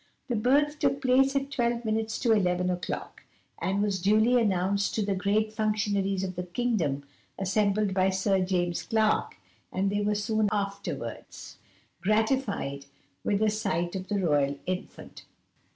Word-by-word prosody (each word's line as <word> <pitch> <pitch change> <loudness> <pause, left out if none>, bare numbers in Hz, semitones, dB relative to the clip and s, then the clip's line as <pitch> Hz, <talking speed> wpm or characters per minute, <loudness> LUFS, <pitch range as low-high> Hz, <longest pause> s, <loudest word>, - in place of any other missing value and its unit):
The 240 - +1
birth 290 +7 +2
took 275 -2 +1
place 270 +1 +3
at 275 0 -1
12 235 -2 0
minutes 220 0 -1
to 235 - +2
11 180 -3 +2
o'clock, 180 0 -5 0.4
and 195 +2 0
was 195 -3 -1
duly 220 +5 +4
announced 200 -1 +1
to 215 - 0
the 200 - 0
great 210 +3 0
functionaries 205 -3 0
of 185 -1 -4
the 180 - -2
kingdom 180 - -1 0.3
assembled 200 +1 +1
by 185 0 +3
Sir 190 0 +1
James 175 -2 0
Clark, 220 -2 +1 0.4
and 195 +1 0
they 205 0 0
were 210 0 +1
soon 215 0 +1
afterwards 200 -1 -5 0.4
gratified 210 - 0 0.4
with 205 +1 +1
a 215 - +3
sight 175 -4 -1
of 190 0 -5
the 205 - -1
royal 145 -5 +1
infant. 185 0 -6
205 Hz, 150 wpm, -28 LUFS, 185-220 Hz, 0.4 s, duly